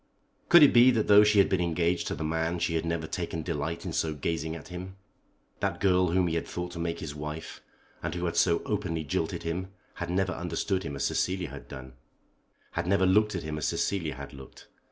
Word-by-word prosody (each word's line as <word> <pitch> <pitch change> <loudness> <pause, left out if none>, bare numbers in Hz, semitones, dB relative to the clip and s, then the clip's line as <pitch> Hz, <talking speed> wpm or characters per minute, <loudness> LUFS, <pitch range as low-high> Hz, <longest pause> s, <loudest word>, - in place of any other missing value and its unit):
Could 175 -3 +9
it 145 - +7
be 120 +2 +8
that 115 -4 +1
though 105 0 +8
she 105 0 +3
had 100 - +6
been 95 -2 +1
engaged 85 0 0
to - - -2
the - - -5
man 80 +2 -1
she 85 - -1
had 80 0 -1
never 85 -1 -2
taken 80 0 -4
delight 85 +1 -3
in 85 - -4
so 80 -1 -1
gazing 80 +2 -2
at 80 - -10
him? 90 +1 -7 0.6
That - - -1
girl 90 -2 +3
whom 90 +2 +2
he 85 - -1
had 85 - -2
thought 90 0 -5
to 85 - -7
make 85 0 -3
his 75 -3 -5
wife, 75 +2 -7 0.4
and - - -3
who 90 0 -2
had 85 -1 -2
so 85 0 +3
openly 90 -7 -2
jilted 70 - -2
him, 85 +3 -3 0.3
had 85 - -5
never 95 +1 0
understood 90 +3 -2
him 70 - -5
as 70 - -3
Cecilia 90 +5 -1
had - - -10
done, 65 -1 -9 0.8
had 85 0 -3
never 95 0 +3
looked 105 +2 +3
at 85 - -3
him 75 0 -4
as 75 - -1
Cecilia 85 -7 -1
had 70 +1 -9
looked. 65 -1 -13
85 Hz, 225 wpm, -28 LUFS, 80-95 Hz, 0.8 s, Could